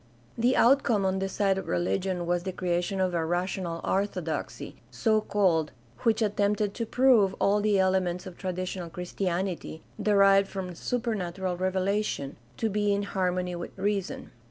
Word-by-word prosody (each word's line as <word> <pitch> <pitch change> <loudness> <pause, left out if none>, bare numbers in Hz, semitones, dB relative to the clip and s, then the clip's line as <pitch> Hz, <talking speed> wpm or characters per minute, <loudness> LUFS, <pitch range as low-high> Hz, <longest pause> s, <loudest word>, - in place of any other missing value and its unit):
The 245 +3 +2
outcome 235 -5 +4
on 190 0 +1
the 195 0 -2
side 195 -1 +1
of - - -8
religion 95 - -1
was 175 0 0
the 190 +1 -4
creation 180 +2 -1
of 185 -1 +1
a - - +1
''rational 175 +1 -2
orthodoxy," 185 -5 -2
so 220 -2 +1
called, 180 -8 +1 0.3
which 225 0 +2
attempted 205 0 +1
to 230 0 -4
prove 230 -7 +4
all 205 +1 +3
the 210 -1 +2
elements 185 -1 +1
of 185 -2 -8
traditional 185 -1 -4
Christianity, 180 -1 -3 0.2
derived 195 -1 +5
from 185 -3 -5
supernatural 190 -5 -2
revelation, 185 -5 -1 0.2
to 225 - 0
be 205 0 +1
in 200 0 +1
harmony 180 -2 -1
with 175 +2 -7
reason. 200 -1 -2
190 Hz, 150 wpm, -28 LUFS, 180-205 Hz, 0.3 s, derived